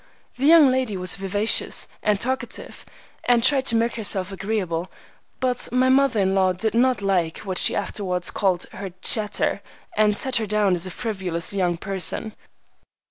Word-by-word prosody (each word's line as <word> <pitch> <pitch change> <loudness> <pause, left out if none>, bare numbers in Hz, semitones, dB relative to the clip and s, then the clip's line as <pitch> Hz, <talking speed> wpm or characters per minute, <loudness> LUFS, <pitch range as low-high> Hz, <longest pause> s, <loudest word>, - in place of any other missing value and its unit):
The 270 +3 0
young 315 -4 +7
lady 255 -6 -1
was 180 -1 +2
vivacious 200 +3 +1
and 210 -2 +1
talkative, 260 +4 -4 0.4
and 240 -2 +3
tried 265 +1 +3
to 230 - +3
make 230 +1 0
herself 200 -3 0
agreeable, 190 -4 -3 0.5
but 250 -3 -1
my 255 +1 +2
mother 265 -3 +3
in 190 0 +1
law 190 -1 +2
did 215 +5 -2
not 245 -2 +1
like 180 -5 0
what 190 -3 -3
she - - +2
afterwards 180 -3 -3
called 185 -3 0
her 195 - -7
"chatter," 215 -2 0 0.3
and 210 -1 +2
set 260 +1 +2
her 220 -2 -2
down 205 -2 +1
as 175 +1 -1
a - - -6
frivolous 190 -5 -2
young 180 -3 0
person. 195 +3 0
205 Hz, 165 wpm, -22 LUFS, 185-240 Hz, 0.5 s, young